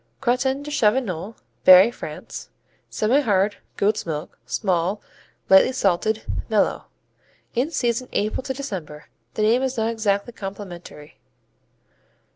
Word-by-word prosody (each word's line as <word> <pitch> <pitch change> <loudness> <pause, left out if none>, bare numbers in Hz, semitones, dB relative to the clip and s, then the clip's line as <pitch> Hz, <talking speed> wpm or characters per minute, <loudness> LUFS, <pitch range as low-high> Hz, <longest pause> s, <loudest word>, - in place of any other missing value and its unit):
Crottin 265 +2 0
de 295 - -7
Chavignol 215 - 0 0.3
Berry, 185 +5 +8
France - - -8 0.4
Semihard; 215 -4 +2 0.2
goat's 210 +2 +1
milk; 155 -2 -6
small; 180 - 0 0.5
lightly 190 +6 +6
salted; 215 -1 0 0.3
mellow. 215 -2 +1 0.7
In 255 +5 0
season 245 -5 -1
April 215 +4 -1
to 265 - -4
December. 180 - -7 0.3
The 215 - 0
name 230 +4 +3
is 265 -1 -2
not 225 +1 +1
exactly 215 0 -1
complimentary. 185 -7 -9
215 Hz, 110 wpm, -23 LUFS, 190-245 Hz, 0.7 s, Berry